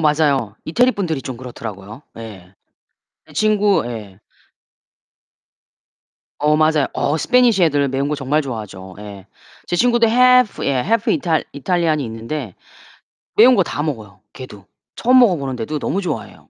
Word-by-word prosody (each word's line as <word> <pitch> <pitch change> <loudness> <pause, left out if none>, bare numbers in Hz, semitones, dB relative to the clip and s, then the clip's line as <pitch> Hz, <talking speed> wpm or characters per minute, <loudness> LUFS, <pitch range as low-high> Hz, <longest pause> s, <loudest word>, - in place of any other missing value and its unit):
맞아요. 145 -8 +1
이태리 245 +10 +2
분들이 165 -8 -3
좀 130 -3 -6
그렇더라고요. 110 -1 -9
예. 100 -5 -11 0.7
제 - - -17
친구 210 -2 +2
예. 105 -5 -8 2.2
어, 150 +1 +2
맞아요. 155 -2 +2
어 145 +3 -1
스패니시 240 -1 +3
애들 145 -3 +1
매운 135 +2 -2
거 150 - -1
정말 150 +2 -1
좋아하죠. 100 -7 -8
예. 100 -2 -10 0.4
제 - - -3
친구도 240 +2 +3
half 250 0 +4
예, 140 - +1
half 225 - 0
이탈 160 -4 0
이탈리안이 155 0 0
있는데 115 0 -6 0.8
매운 245 +3 +7
거 190 - +3
다 145 - -4
먹어요, 110 -10 -6
걔도. 105 -7 -11 0.3
처음 255 +2 +4
먹어보는데도 145 - 0
너무 190 +7 -2
좋아해요. 150 - -5
145 Hz, 320 characters per minute, -19 LUFS, 115-190 Hz, 2.2 s, 매운